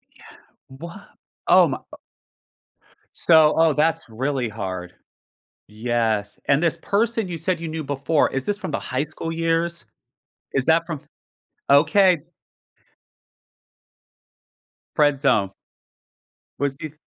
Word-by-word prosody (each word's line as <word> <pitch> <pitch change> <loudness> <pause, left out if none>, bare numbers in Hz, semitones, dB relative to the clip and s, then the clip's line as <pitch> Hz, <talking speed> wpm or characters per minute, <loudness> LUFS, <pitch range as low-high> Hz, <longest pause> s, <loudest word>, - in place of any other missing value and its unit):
Yeah, - - -17 0.4
what? 170 +9 -11 0.4
Oh, - - +6
my, - - -3
uh - - -9 1.2
So, 160 -2 +5
oh, 160 -2 +4
that's 155 -4 0
really 130 +1 -2
hard. 95 -4 -6 0.7
Yes, 110 -1 -2
and 140 +3 +3
this 165 -1 +2
person 220 +3 0
you 170 - -5
said 175 +2 -1
you 165 - -4
knew 155 -1 -5
before, 145 +2 +1
is 135 -1 -3
this 205 0 -1
from 185 - -5
the - - -1
high 130 +2 -2
school 155 +2 -5
years? 165 +1 -1 0.7
Is 135 -1 0
that 165 +1 +3
from 160 -5 -6 0.7
Okay. 180 +5 +5 2.8
Friend 145 -2 +3
zone. 100 -9 +2 1.1
Was 140 -1 -2
he 155 -1 -7
150 Hz, 120 wpm, -22 LUFS, 130-165 Hz, 2.8 s, Oh